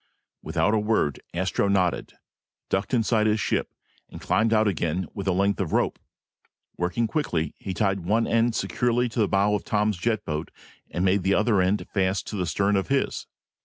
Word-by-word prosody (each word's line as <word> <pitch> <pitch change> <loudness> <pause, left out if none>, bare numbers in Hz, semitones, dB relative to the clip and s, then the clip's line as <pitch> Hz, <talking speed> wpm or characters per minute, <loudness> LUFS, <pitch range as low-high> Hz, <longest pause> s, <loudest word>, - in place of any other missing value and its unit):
Without 105 - 0
a 110 - +3
word, 105 -9 0
Astro 95 +3 0
nodded, 95 -3 0 0.6
ducked 95 +2 0
inside 115 -3 +2
his 110 0 +2
ship, - - -1 0.4
and - - -10
climbed 110 0 +1
out 110 -1 +3
again 90 -2 -1
with 100 -1 -5
a - - +3
length 100 +2 +1
of 90 - -3
rope. - - +1 0.8
Working 90 +7 0
quickly, 90 - -1
he 95 -2 -5
tied 100 -2 +1
one 105 +6 +1
end 115 0 +2
securely 120 0 0
to 115 - -4
the 105 - +3
bow 100 +2 +2
of 105 - -1
Tom's 105 -2 0
jet 110 0 -1
boat 75 +1 -3 0.4
and 90 - -1
made 95 +1 +3
the 95 +2 +2
other 105 -2 +3
end 95 +3 +1
fast 95 -1 0
to - - -5
the 90 -3 -1
stern 100 +3 +1
of 95 - -1
his. 140 0 -1
100 Hz, 190 wpm, -25 LUFS, 95-110 Hz, 0.8 s, a